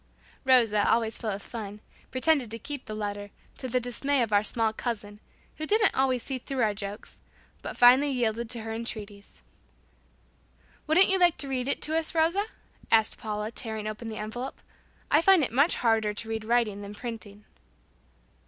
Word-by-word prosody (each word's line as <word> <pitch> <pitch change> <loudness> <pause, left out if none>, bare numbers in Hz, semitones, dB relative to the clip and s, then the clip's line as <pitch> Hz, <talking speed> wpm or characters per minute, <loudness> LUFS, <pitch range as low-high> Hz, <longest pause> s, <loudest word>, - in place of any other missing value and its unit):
Rosa, 230 -6 +4
always 225 -1 +1
full 225 - -3
of 200 0 -4
fun, 210 -3 -7 0.3
pretended 265 -2 +1
to 230 - 0
keep 280 +2 -7
the 215 - -5
letter, 205 -1 -4 0.3
to 260 - -3
the 250 0 +1
dismay 250 +2 +1
of 220 -2 -3
our 205 - +5
small 220 0 +1
cousin, 210 -3 -5 0.4
who 310 - -4
didn't 425 +1 +3
always 260 -2 +1
see 265 -2 -4
through 260 0 -2
our 215 -1 +2
jokes, 200 0 -8 0.4
but - - -7
finally 255 +4 +6
yielded 235 -3 -1
to 235 -1 +1
her 220 0 -5
entreaties. 210 - -7 1.4
"Wouldn't 345 +5 +5
you 380 0 +3
like 350 -2 +4
to 280 - -3
read 255 -1 -2
it 280 - -1
to 315 - 0
us, 325 0 0
Rosa?" 335 +6 +2 0.4
asked 220 -1 +3
Paula, 210 0 -4
tearing 220 -3 -3
open 215 +2 -5
the 215 - -6
envelope. 240 +5 -5 0.5
"I 300 - +5
find 375 -2 +5
it 255 - -1
much 280 +8 +3
harder 220 -3 +1
to 225 - -5
read 220 -1 -4
writing 225 -3 +1
than 200 +1 -8
printing." 215 -3 -8
230 Hz, 180 wpm, -27 LUFS, 215-270 Hz, 1.4 s, finally